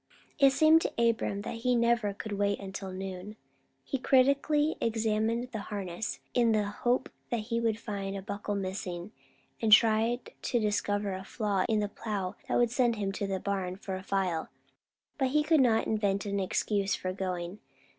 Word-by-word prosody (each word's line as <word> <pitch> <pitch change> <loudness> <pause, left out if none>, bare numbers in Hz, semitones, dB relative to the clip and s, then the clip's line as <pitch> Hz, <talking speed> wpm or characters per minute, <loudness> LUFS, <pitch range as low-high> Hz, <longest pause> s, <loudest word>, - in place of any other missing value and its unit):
It 275 -1 +7
seemed 315 +3 +6
to - - -1
Abram 230 -3 +1
that - - -5
he 250 +2 +1
never 235 -3 +2
could 205 +2 -7
wait 200 0 0
until 195 -1 -6
noon. 190 +2 -6 0.5
He 270 - -3
critically 280 +4 +3
examined 225 +1 0
the 220 - -4
harness, 200 -1 -4
in 235 -2 +3
the 215 -1 +2
hope 240 +5 0 0.2
that 235 -2 -1
he 230 +2 -2
would 225 -2 +1
find 200 -3 -4
a 195 - -7
buckle 205 0 -3
missing, 185 -1 -4 0.5
and 220 -2 +1
tried 225 +2 +4
to 240 - 0
discover 205 -1 0
a 190 0 -5
flaw 200 -3 -1
in 215 -1 +2
the 205 - 0
plow 200 -3 -4
that - - +1
would 240 -2 +3
send 240 -1 +2
him 200 -2 -2
to 200 +1 -3
the 190 -1 -2
barn 190 -2 -2
for 195 0 -6
a 185 - -5
file; 190 -4 -1 0.7
but 265 - +3
he 300 +3 +2
could 310 -1 +4
not 230 -3 +3
invent 200 -2 0
an 200 0 -1
excuse 195 +1 0
for 185 0 -3
going. 185 0 -4
210 Hz, 180 wpm, -30 LUFS, 195-235 Hz, 0.7 s, It